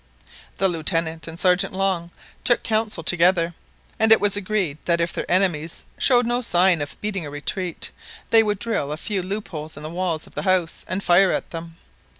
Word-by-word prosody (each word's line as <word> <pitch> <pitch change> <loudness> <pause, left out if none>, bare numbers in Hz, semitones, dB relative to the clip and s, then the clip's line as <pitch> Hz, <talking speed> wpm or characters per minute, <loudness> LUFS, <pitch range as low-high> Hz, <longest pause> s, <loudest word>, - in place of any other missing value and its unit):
The 195 - +3
Lieutenant 165 -1 -2
and 165 0 -8
the - - -1
Sergeant 185 -1 +1 0.3
took 240 -2 +3
counsel 215 -5 -1
together, 175 0 +3 0.5
and 220 0 +4
it 220 - +8
was 205 0 +2
agreed 190 -7 -1
that 170 -1 +1
if 170 0 -1
their - - -5
enemies 175 -4 +1
showed 245 -2 +4
no 240 +1 0
sign 180 -6 +3
of 145 - -6
beating 205 -4 -3
a - - -6
retreat, 165 +4 -4 0.4
they 225 - +8
would 210 -2 +1
drill 205 -9 -2
a 150 - -3
few 200 +3 -2
loopholes 175 -6 -5
in 150 - -8
the 155 - -6
walls 170 -3 -2
of - - -18
the - - -3
house, 185 -4 0
and 190 +2 -3
fire 180 +2 +5
at - - -3
them. 165 0 -8
180 Hz, 190 wpm, -22 LUFS, 165-205 Hz, 0.5 s, it